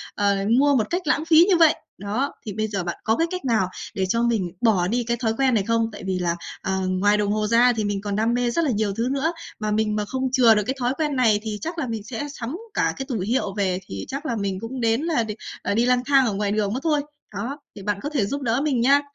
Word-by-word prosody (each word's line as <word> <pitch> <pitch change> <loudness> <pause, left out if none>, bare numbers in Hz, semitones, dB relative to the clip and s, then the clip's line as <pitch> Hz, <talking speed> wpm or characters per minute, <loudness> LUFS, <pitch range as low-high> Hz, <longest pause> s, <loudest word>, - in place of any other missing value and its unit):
ờ, 200 -1 +2 0.2
mua 285 0 +4
một 225 -4 +1
cách 355 +2 -1
lãng 305 +1 +1
phí 325 +1 +7
như 360 - +5
vậy? 325 -2 +6 0.2
Đó, 215 +8 -2
thì 210 - -4
bây 215 +1 -1
giờ 200 -3 -3
bạn 175 0 -4
có 220 - +2
cái 330 - +2
cách 365 -6 -4
nào 220 -7 +2 0.3
để 190 - 0
cho 230 +5 +1
mình 215 -7 0
bỏ 205 -7 +3
đi 240 +4 0
cái 235 +1 -1
thói 225 -1 0
quen 265 -2 +3
này 210 - +2
không? 230 +1 +1
Tại 205 - -9
vì 190 -1 -1
là, 170 -1 0 0.3
ờ, 190 0 -1
ngoài 205 +3 +2
đồng 205 -1 0
hồ 215 0 0
ra 240 +2 +5
thì 220 - -2
mình 205 -1 -2
còn 205 -1 -3
đam 225 +3 +1
mê 245 0 +1
rất 335 +7 +1
là 280 - +1
nhiều 210 -2 0
thứ 230 +5 -1
nữa, 280 +4 0 0.3
mà 215 0 -2
mình 215 0 +1
mà 210 - -1
không 260 +3 -2
chừa 240 -4 +6
được 210 - +1
cái 265 - -1
thói 245 +1 +1
quen 300 -3 -1
này 225 -5 +3
thì 215 -2 -3
chắc 330 +2 -4
là 295 -6 -2
mình 225 -3 -4
sẽ 255 +6 -5
sắm 250 +7 -4 0.2
cả - - +1
cái 270 - -4
tủ 230 - -1
hiệu 205 +1 -1
về 185 -2 0
thì 95 0 -6
chắc 280 +3 -5
là 240 - -1
mình 195 -3 -2
cũng 245 +3 -6
đến 225 +2 +2
là 315 -7 +1
đì 215 -1 -5 0.3
ờ, - - -4
là - - +1
đi 230 +2 +3
lang 250 0 +2
thang 275 -2 +4
ở 220 - 0
ngoài 200 0 -1
đường 210 0 0
mất 255 - -1
thôi! 305 -3 +2 0.3
Đó, 255 +9 -4 0.2
thì 200 - -9
bạn 205 0 -1
có 290 - -3
thể 275 -9 0
giúp 280 +8 -3
đỡ 240 0 +1
mình 270 -6 +1
nha! 280 +3 +5
230 Hz, 290 wpm, -23 LUFS, 205-265 Hz, 0.3 s, phí